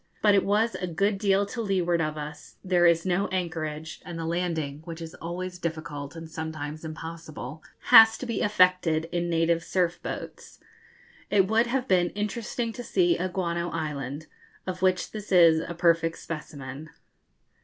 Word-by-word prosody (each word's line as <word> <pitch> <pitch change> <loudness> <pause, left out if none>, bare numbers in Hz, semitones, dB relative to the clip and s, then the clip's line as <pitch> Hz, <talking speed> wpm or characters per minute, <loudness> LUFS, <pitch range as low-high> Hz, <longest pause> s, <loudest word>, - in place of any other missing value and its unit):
But 210 -1 +6
it 200 - +4
was 215 +3 +2
a 180 - -3
good 195 +4 0
deal 200 -1 +3
to 230 +4 -5
leeward 180 -5 +1
of 155 -1 -2
us; 150 0 -8
there 180 -2 +4
is 170 0 +3
no 190 +2 +1
anchorage, 160 -4 -4
and 175 -1 -7
the 165 - -4
landing, 160 -4 -2
which 165 0 -7
is 165 -1 -7
always 180 +2 -6
difficult 155 -3 -5
and 165 0 -8
sometimes 155 -1 -6
impossible, 160 -2 -7 0.3
has 225 0 +9
to - - -6
be 230 -3 -2
effected 180 -5 +3
in 175 0 -1
native 165 0 +2
surf 175 -1 0
boats. - - -7 0.7
It 195 -2 +4
would 225 +3 +3
have 255 +1 -1
been 175 -5 +3
interesting 225 +2 -3
to 245 - -7
see 175 -6 +2
a 185 +2 -2
guano 175 -2 -2
island, 150 -2 -4 0.4
of 185 0 -5
which 185 -1 +1
this 210 -1 -8
is 170 -3 +6
a 170 +1 -5
perfect 165 -1 +2
specimen. 145 -2 -7
170 Hz, 165 wpm, -27 LUFS, 160-190 Hz, 0.7 s, has